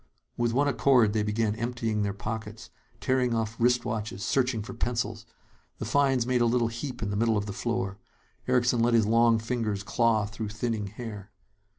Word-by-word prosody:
With 120 -1 0
one 140 +4 +2
accord, 120 -3 +4
they 110 - +1
began 105 0 0
emptying 115 -2 -1
their 100 -1 0
pockets, 110 +1 -6 0.3
tearing 125 -2 +1
off 110 0 -2
wristwatches, 115 -4 0
searching 125 -5 +1
for 125 - -8
pencils. 115 -2 -2 0.5
The - - -5
finds 135 -4 +2
made 125 -1 +1
a 120 - +4
little 120 -1 +2
heap 120 +1 -5
in 100 - -2
the - - -2
middle 115 +1 +2
of 100 - -1
the 105 - -5
floor. 105 -3 -2 0.5
Erickson 125 -1 +2
let 115 +1 +3
his 110 -2 +4
long 115 +1 +4
fingers 110 -3 -2
claw 110 -1 +2
through 110 0 -5
thinning 110 -1 -2
hair. 105 -1 -8
115 Hz, 180 wpm, -28 LUFS, 105-120 Hz, 0.5 s, accord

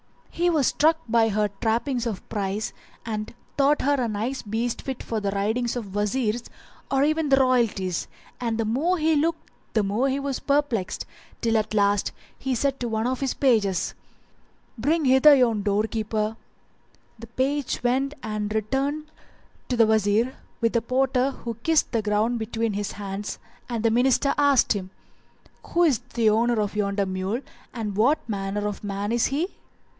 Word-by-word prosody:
He 350 +1 +1
was 310 -6 +2
struck 315 +5 +3
by 225 0 +3
her 210 0 +1
trappings 240 +2 0
of 210 -5 -5
price 205 0 -2 0.3
and 215 0 -4 0.2
thought 285 +1 +3
her 285 - +3
a 240 - +1
nice 225 +5 -2
beast 225 +3 -2
fit 265 -2 -5
for 225 - -2
the 200 -1 -1
riding 210 +5 0
of 230 -5 -4
Wazirs 215 +3 0 0.4
or 270 0 +2
even 310 0 +1
of 270 - +6
royalties; 230 -9 +1 0.3
and 230 -2 -1
the 225 - 0
more 295 +12 +1
he 315 0 +2
looked 325 +3 -1 0.2
the 215 - +2
more 215 +7 +1
was 275 -1 -2
he - - -28
perplexed 280 -9 0 0.4
till 230 -1 +1
at 215 0 -1
last 200 -1 +2 0.3
he 265 -1 -1
said 275 +2 0
to 245 - -2
one 220 0 -1
of 255 +1 -1
his 270 -2 -1
pages, 215 -9 +2 0.8
"Bring 295 +7 +1
hither 265 +3 +7
yon 235 -5 +3
door 205 +1 +1
keeper," 220 0 -2 0.8
The 230 - -9
page 270 +2 -1
went 270 +4 +1
and 215 -1 -3
returned 275 +8 -1 0.6
to 250 - 0
the 230 - +6
Wazir 220 +3 +2 0.3
with 230 -1 +2
the 235 - +2
porter 255 +2 +1
who 240 -3 -6
kissed 320 +1 +2
the 230 -3 +1
ground 215 +3 +1
between 225 0 -2
his 205 0 -3
hands, 200 0 -5 0.3
and 235 -2 -2
the 225 - +4
Minister 260 +4 +3
asked 285 -5 +4
him, 190 -3 -5 0.8
"Who 345 - +2
is 290 -9 +3 0.2
the 225 -3 +4
owner 230 +1 +2
of 210 0 -1
yonder 200 -1 0
mule 190 +5 -2 0.3
and 215 -4 -4
what 245 +9 +2
manner 205 -1 -2
of 205 0 -5
man 200 +1 -3
is 235 0 +2
he?" 310 +8 -1
230 Hz, 170 wpm, -25 LUFS, 210-270 Hz, 0.8 s, hither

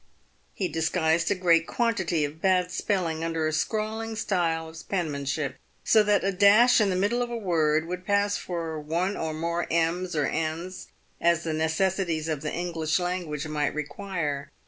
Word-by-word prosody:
He 190 - -1
disguised 160 0 +1
a 200 - +2
great 170 -3 +3
quantity 190 -10 0
of 150 +3 -8
bad 180 -1 +2
spell 190 0 0
ing 160 0 -3
under 165 -1 -1
a 155 - 0
scrawling 220 +5 -2
style 170 -6 0
of 160 0 -11
penmanship, 145 -5 -2 0.3
so 220 - +5
that 210 -1 +2
a 195 - +1
dash 205 +6 +6
in 205 - +3
the 185 - 0
middle 205 +6 +1
of 240 - -2
a 240 - -3
word 160 -6 +1
would 180 +2 -5
pass 205 0 +2
for 165 -3 -4
one 170 +6 -1
or 160 -1 -3
more 170 +2 -2
m's 170 +2 0
or 150 -2 +2
n's, 165 +3 -3 0.3
as 170 0 +3
the 160 - -2
ne 160 +1 +1
cessities 170 -2 0
of 155 -3 -2
the 150 - -3
English 165 -3 -1
language 175 -5 -3
might 150 -2 -1
require. 150 -2 -3
170 Hz, 180 wpm, -26 LUFS, 160-190 Hz, 0.3 s, dash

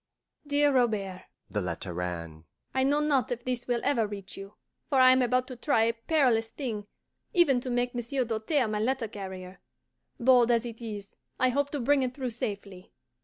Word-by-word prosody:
DEAR 290 0 +3
ROBERT 210 -7 0 0.3
(the 105 - -1
letter 90 0 -4
ran): 85 -3 -5 0.3
I 265 - +1
know 290 +2 +2
not 280 -6 +1
if 240 0 -3
this 250 -1 -2
will 240 -1 0
ever 235 -6 +2
reach 200 -2 -7
you, 195 +1 -10 0.3
for 275 -3 +3
I 255 0 +8
am 255 0 +4
about 250 +1 +2
to 255 - -6
try 240 -1 +2
a 230 +1 +2
perilous 230 -2 +2
thing, 220 -7 -5 0.5
even 285 -8 +4
to 255 - -5
make 245 0 0
Monsieur 245 +2 -1
Doltaire 230 +4 0
my 210 -1 -2
letter 245 +1 0
carrier. 190 -3 -8 0.6
Bold 245 -1 +5
as 235 0 +2
it 230 0 -8
is, 205 -3 -7 0.2
I 255 - +4
hope 285 +3 0
to 290 - -3
bring 275 +3 +3
it 255 -1 -2
through 260 -3 -3
safely. 200 -4 -6
240 Hz, 190 wpm, -28 LUFS, 205-260 Hz, 0.6 s, I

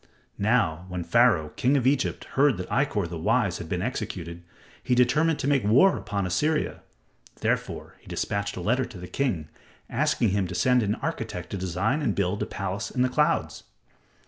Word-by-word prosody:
Now, 100 -6 +1
when 90 -1 -4
Pharaoh, 90 -4 +3
king 130 - +1
of 125 - 0
Egypt, 135 0 +1
heard 140 -5 +3
that 90 - -6
Ikkor, 110 -10 +1
the 85 -1 -6
wise, 105 -1 +1
had 80 - -7
been 90 +1 -1
executed, 85 -8 -4 0.4
he 125 -1 +1
determined 150 +6 +3
to - - -2
make 140 -3 +2
war 130 - +5
upon 100 -2 -3
Assyria. 150 - 0 0.6
Therefore, - - -2
he - - -23
dispatched 100 -1 -2
a - - -4
letter 125 +7 +1
to 120 -6 -11
the 90 - -8
king, 90 - -2 0.4
asking 115 - +1
him 95 -1 0
to 90 - -6
send 125 +7 +3
an 105 -1 0
architect - - -5
to - - -3
design 95 - -1
and 110 -9 0
build 100 +1 -1
a - - -1
palace 100 +2 -4
in 125 - 0
the 130 - +2
clouds. 150 +4 0
105 Hz, 185 wpm, -26 LUFS, 90-125 Hz, 0.6 s, war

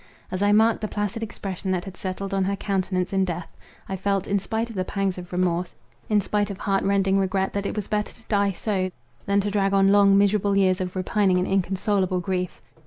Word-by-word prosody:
As 185 +1 -3
I 205 0 +4
marked 220 +2 +4
the 215 - -1
placid 205 +2 -3
expression 195 -3 -5
that 185 -2 0
had 190 -2 -8
settled 190 +1 -4
on 195 -1 +2
her 200 +1 0
countenance 190 -2 -1
in 190 0 +3
death, 175 -2 -4 0.3
I 190 - -3
felt, 195 0 0
in 200 0 +1
spite 225 +4 -3
of - - -10
the 185 - 0
pangs 195 -1 -2
of 175 0 -10
remorse, 180 -1 0 0.3
in 210 -1 +3
spite 205 +1 0
of 200 - -5
heart 195 0 0
rending 195 0 +2
regret, 190 0 0
that 200 0 -1
it - - -4
was 210 -2 -3
better 210 0 -1
to 225 - -17
die 200 -2 +2
so, 190 -1 -1 0.4
than 200 0 +3
to 205 +1 -2
drag 195 -1 +1
on 195 0 +5
long, 200 -1 +6
miserable 200 0 +3
years 185 -1 +3
of 180 0 -4
repining 190 0 +2
and 180 - 0
inconsolable 190 0 +1
grief. 180 0 -3
195 Hz, 225 wpm, -24 LUFS, 185-205 Hz, 0.4 s, long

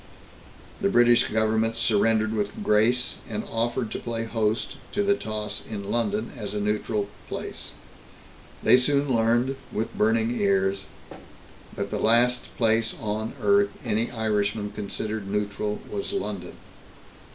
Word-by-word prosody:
The 200 - +3
British 120 -6 +5
Government 110 +1 +1
surrendered 110 0 +2
with 105 -2 -2
grace, 120 +4 +2
and 105 -1 -3
offered 115 0 -2
to - - -3
play 115 -1 -3
host 110 -1 -1 0.2
to 205 - +1
the 200 0 +4
toss 105 - -4
in 100 -2 -5
London, 110 -1 0
as 105 -1 -5
a - - 0
neutral 105 0 -1 0.2
place. - - -5 0.9
They - - +7
soon 140 0 +2
learned, 120 +4 +2
with 110 +2 -3
burning 110 +1 +2
ears, 95 -1 +1 0.9
that - - -3
the - - -1
last 120 +2 +4
place 115 -1 +2
on 110 +1 -3
earth 200 0 +4 0.2
any 110 +1 +1
Irishman 105 -2 -1
considered 105 0 -4
neutral 105 +1 -2
was 100 -1 -4
London. 100 -3 -3
110 Hz, 130 wpm, -26 LUFS, 105-120 Hz, 0.9 s, They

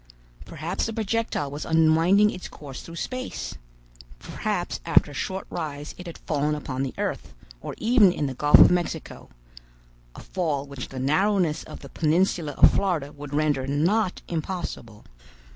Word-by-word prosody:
Perhaps 165 +5 -3
the 225 - -4
projectile 220 -9 -1
was 145 +2 -5
unwinding 165 +6 +4
its 180 - -7
course 140 -3 -9
through 170 - -10
space. 255 +8 -4 0.6
Perhaps - - -3
after - - +3
a - - -10
short 190 +7 -3
rise 150 -3 -5
it 180 - -10
had 170 - -8
fallen 150 0 -1
upon 135 -3 -4
the 135 -1 -3
earth, - - -4 0.3
or - - -6
even 220 -4 +5
in 150 - -2
the 135 - -2
Gulf 145 +3 +6
of - - +8
Mexico—a - - -7
fall 155 -7 -2
which 140 -3 -7
the 135 - -9
narrowness 170 +4 +1
of - - -10
the - - -10
peninsula 165 -1 +1
of - - +6
Florida 165 -8 0
would 145 -1 -7
render 145 -3 +1
not 180 +8 +1
impossible. 160 - -5
155 Hz, 155 wpm, -25 LUFS, 140-180 Hz, 0.6 s, of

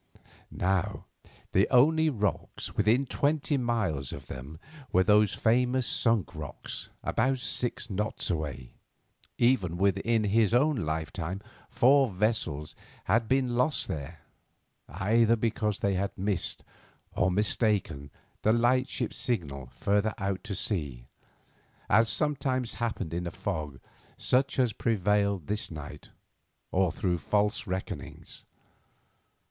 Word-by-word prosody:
Now, 95 +2 -1 0.5
the 95 - +3
only 160 +5 +5
rocks 105 -7 -3
within 110 +6 +3
twenty 145 +2 0
miles 110 - -1
of 70 - -8
them 65 +5 -8 0.3
were 95 - +4
these 105 +1 +4
famous 125 +2 +2
Sunk 115 -6 +1
Rocks, 75 -4 -6
about 135 0 +1
six 120 -1 -1
knots 105 -1 -2
away. 75 -6 -4 0.6
Even 105 -9 +2
within 100 +4 +2
his 110 +2 +3
own 150 +4 +3
lifetime 80 +1 -3 0.3
four 135 +1 +4
vessels 95 -7 -1 0.3
had 115 0 +1
been 130 -1 +1
lost 125 +5 +1
there, 75 +2 -6 0.7
either 110 +7 +3
because 110 -2 -1
they 100 - +1
had 95 +1 -2
missed, 95 -2 -1 0.5
or 90 - +1
mistaken, 100 - 0 0.3
the 110 - +3
lightship 120 +1 +1
signal 70 - -2
further 105 - 0
out 95 -2 -2
to 105 -3 -4
sea, 70 - -2 0.9
as 110 +3 +5
sometimes 130 -5 0
happened 105 -8 -2
in 85 +1 -2
a - - -4
fog 80 -8 -4 0.4
such 135 +2 +1
as 125 -4 +2
prevailed 100 -4 +1
this 105 +4 -2
night, 75 -2 -9 0.6
or 95 -2 +2
through 90 0 -1
false 105 +6 0
reckonings. 95 0 -6
105 Hz, 120 wpm, -29 LUFS, 90-120 Hz, 0.9 s, only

